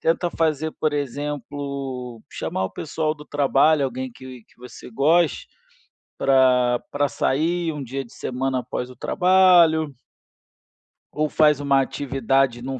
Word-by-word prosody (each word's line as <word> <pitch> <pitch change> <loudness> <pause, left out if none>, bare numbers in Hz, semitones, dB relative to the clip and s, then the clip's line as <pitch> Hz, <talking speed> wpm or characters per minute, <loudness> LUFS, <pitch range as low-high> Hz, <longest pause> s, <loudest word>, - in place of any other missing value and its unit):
tenta 170 +1 0
fazer, 160 -1 0
por 155 -1 0
exemplo, 140 -3 -5
chamar 95 - -3
o 95 - -4
pessoal 155 0 -3
do 150 -1 -13
trabalho, 145 +1 +2
alguém 130 0 -5
que 130 -2 -11
que - - -29
você 125 0 -12
goste 155 +6 +2 0.7
pra 125 -2 +3
pra 145 -1 0
sair 165 +3 0
um 145 -2 -6
dia 135 +2 -5
de 120 - -18
semana 130 0 -2
após 125 +1 -5
o - - -14
trabalho 175 -4 +4 1.2
Ou 155 0 0
faz 150 -2 +3
uma 140 -1 +3
atividade 135 -2 0
em 125 - -8
um 135 -1 -4
140 Hz, 140 wpm, -22 LUFS, 130-155 Hz, 1.2 s, trabalho